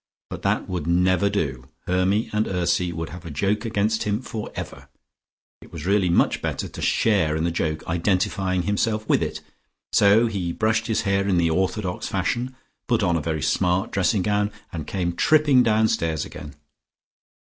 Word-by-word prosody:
But - - -6
that - - 0
would 90 -4 -4
never 90 +3 +3
do: 70 -10 -2 0.2
Hermy 95 +5 +1
and 105 +1 +1
Ursy 90 -1 0
would 80 -2 -5
have 85 +2 -9
a 85 - -7
joke 100 +10 -1
against 110 0 0
him 105 +1 0
forever. 115 -4 -7 0.7
It - - -15
was 80 -2 -7
really 100 -1 +2
much 85 - +2
better - - -3
to - - -9
share 95 -9 +2
in 80 - -1
the 85 - +1
joke, 80 -2 -2
identifying 90 +1 0
himself 110 +3 -1
with - - +3
it. - - -3 0.5
So 105 +3 +5
he 95 -7 -2
brushed 110 +2 0
his 110 -1 +1
hair 100 -1 0
in 95 -3 +2
the 85 -1 +2
orthodox 95 +1 -1
fashion, 120 +7 -2 0.3
put 120 -4 +1
on 85 -3 +2
a 80 - 0
very 80 -1 -2
smart 90 +4 +1
dressing 95 +1 +1
gown, 105 +1 +1 0.2
and 80 -4 -5
came 90 -3 -2
tripping 145 - +4
downstairs 110 -9 +1
again. 75 -2 -10
95 Hz, 170 wpm, -23 LUFS, 85-105 Hz, 0.7 s, So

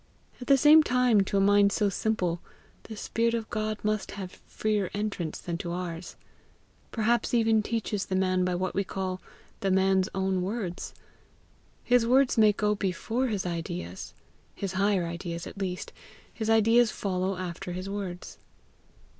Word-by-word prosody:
At 245 - -7
the 275 - +6
same 300 +3 +8
time, 250 -6 +3
to 200 - -1
a - - +4
mind 200 0 +5
so 210 0 +1
simple, 180 -4 -1 0.4
the 220 - -8
spirit 230 +2 0
of 225 -1 -4
God 215 0 -2
must 215 -1 -1
have 185 -2 -7
freer 210 -3 -1
entrance 200 -6 -3
than 170 -1 -5
to 170 - -4
ours 175 -1 -5 0.7
perhaps 235 +1 +1
even 225 -2 +3
teaches 210 -2 -2
the 190 - -1
man 185 -1 +2
by 180 0 0
what 185 +1 -2
we 195 - 0
call 185 -1 -4 0.4
THE 195 - 0
MAN'S 190 0 +3
OWN 190 -1 0
WORDS. 190 -2 -4 0.9
His 245 -1 +4
words 260 +1 +4
may 215 -2 +6
go 210 0 0
before 210 +6 -1
his 205 -6 -2
ideas 170 - -5 0.4
his 195 -2 -4
higher 195 -1 +2
ideas 170 0 -5
at 195 - -9
least 185 -2 -4 0.4
his 220 -1 -3
ideas 225 +1 +5
follow 190 -2 -2
after 180 -1 -5
his 185 +2 -5
words. 195 -3 -6
195 Hz, 160 wpm, -28 LUFS, 185-220 Hz, 0.9 s, same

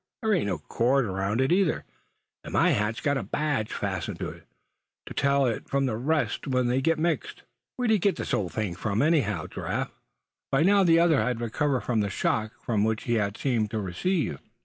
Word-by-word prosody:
There 220 -1 +2
ain't 170 - +1
no 95 -4 -1
cord 125 - +1
around 95 +4 -1
it 130 - +1
either; 180 -2 +2 0.6
and - - -8
my - - +4
hat's 105 +3 0
got 140 -1 +1
my - - -1
badge 145 -8 -1
fastened - - -3
to - - -4
it, - - -13 0.6
to - - -8
tell 140 0 +2
it 115 -3 -2
from 140 0 +1
the 120 -4 -1
rest 150 +6 -1
when 125 -2 +1
they 130 +2 +1
get 165 +4 +2
mixed. 165 +1 -2 0.3
Where'd 245 -3 +1
you 215 - +4
get 195 +2 +2
this - - -4
old 95 -4 0
thing, 105 -6 -2
anyhow, 110 - +1
Giraffe?" - - -3 0.6
By 135 +3 +3
now 200 +2 +5
the 165 -2 +5
other 165 -4 +4
had 125 -2 -1
recovered 130 +3 0
from 120 -3 0
the 100 -1 0
shock 110 +3 0 0.2
which 110 -1 +1
he 115 -2 +1 0.2
seemed 115 -6 0
to 110 - -3
have 105 - -2
received. 145 - -1
125 Hz, 200 wpm, -27 LUFS, 110-155 Hz, 0.6 s, now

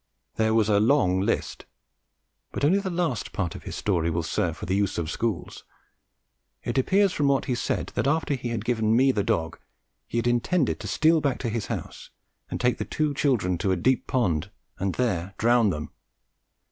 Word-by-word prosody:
There 110 0 +1
was 110 -2 +3
a 105 -1 +3
long 105 -6 +3
list, 100 - -2 0.8
but - - -1
only 185 +7 +4
the 195 -1 -3
last 170 - -2
part 90 -5 -2
of - - -10
his - - -5
story 85 -5 0
will 85 0 -1
serve 80 - -1
for - - -6
"the 95 - 0
use 100 -1 0
of 85 -1 -2
schools." 110 -7 -3 1.0
It - - 0
appears 195 +7 +3
from 145 - +1
what 140 -1 +2
he 125 - -1
said 120 - -2
that, - - 0
after 155 0 +1
he 125 -3 -3
had 115 -2 -3
given 110 -2 +1
me 135 +3 +5
the 105 - 0
dog, 80 -3 -1 0.5
he - - -4
had 115 - 0
intended 125 +6 +1
to - - -6
steal 160 0 +3
back 140 -3 0
to 120 - -1
his 115 -1 -3
house - - -6 0.4
and - - -4
take 125 -1 +1
the - - -1
two 150 -1 -1
children 110 - +1
to 95 - 0
a - - +3
deep 125 +9 +1
pond 90 -9 0 0.3
and 95 -1 -1
there 95 -7 -1
drown 120 -1 +4
them. 75 -4 -4
115 Hz, 200 wpm, -26 LUFS, 95-135 Hz, 1.0 s, me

